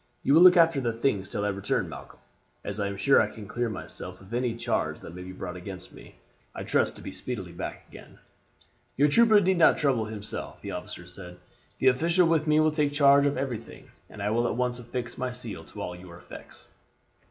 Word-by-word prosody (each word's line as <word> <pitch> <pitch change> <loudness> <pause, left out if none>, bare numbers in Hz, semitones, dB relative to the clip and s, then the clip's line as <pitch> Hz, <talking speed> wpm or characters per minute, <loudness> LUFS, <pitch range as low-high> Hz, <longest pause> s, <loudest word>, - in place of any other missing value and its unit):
'You 140 - +3
will 160 - +7
look 180 0 +9
after 165 -4 +4
the 120 -2 -1
things 110 -5 -1
till 100 - -2
I - - +1
return, 100 -1 -1
Malcolm. - - -10 0.5
As 100 +1 -4
I 100 - 0
am 100 0 -5
sure 135 +7 +5
I - - 0
can 105 -3 -10
clear 120 +2 -2
myself 90 -3 -8
of 100 +3 -13
any 120 -1 0
charge 115 - -2
that - - -10
may 90 - -8
be 90 0 -8
brought 90 -1 -7
against 90 0 -9
me, - - -14 0.4
I - - -5
trust - - +1
to - - -12
be - - -6
speedily 100 -9 -5
back 85 - -7
again. - - -14 0.8
"'Your 145 +3 +4
trooper 220 +5 +6
need 190 -2 +2
not 160 - +6
trouble 130 -7 +1
himself,' 105 -1 -7
the - - -5
officer 90 - -7
said; 90 0 -11 0.4
'the 130 - +1
official 165 +7 +3
with 160 -1 +1
me 155 0 +4
will 155 0 +4
take 150 -2 0
charge 140 -1 +5
of 140 - -1
everything, 120 -5 -6 0.2
and 105 - -8
will 120 +1 +2
at - - -2
once 125 -1 0
affix 120 0 -6
my 130 0 -2
seal 120 -3 -7
to - - -10
all 90 - -5
your 90 -1 -12
effects.' 85 - -12
120 Hz, 220 wpm, -27 LUFS, 100-145 Hz, 0.8 s, look